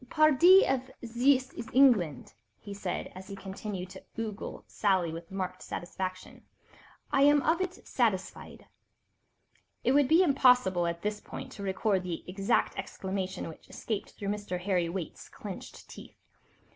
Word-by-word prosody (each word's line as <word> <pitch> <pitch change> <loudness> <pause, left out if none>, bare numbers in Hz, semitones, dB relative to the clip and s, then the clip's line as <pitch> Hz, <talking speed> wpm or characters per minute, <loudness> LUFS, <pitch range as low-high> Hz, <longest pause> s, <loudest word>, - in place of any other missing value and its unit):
"Pardi, 310 +5 +7
if 260 -1 -1 0.2
zis 255 +3 +2
is 235 +1 -7
England," 210 - +3 0.3
he 205 - -8
said 195 -2 -4
as 185 +1 -10
he 200 - -7
continued 195 -1 -6
to 190 - -11
ogle 220 -2 -5
Sally 185 -5 +1
with 165 0 -8
marked 185 -1 -4
satisfaction, 185 +1 -6 0.7
"I 275 - +3
am 290 0 +5
of 330 +3 +2
it 370 0 -4
satisfied." 215 -7 -2 1.2
It - - +3
would 285 0 +4
be 330 +5 +6
impossible 250 - +4
at 170 0 -4
this 210 0 -2
point - - -8
to - - -9
record 195 0 0
the 180 -2 -5
exact 195 +2 0
exclamation 190 -1 -4
which 160 - -12
escaped 215 -3 -4
through 200 - -5
Mr. 205 -3 -3
Harry 180 -3 0
Waite's 175 -2 -6
clenched - - -9
teeth. - - -12
200 Hz, 145 wpm, -30 LUFS, 185-255 Hz, 1.2 s, Pardi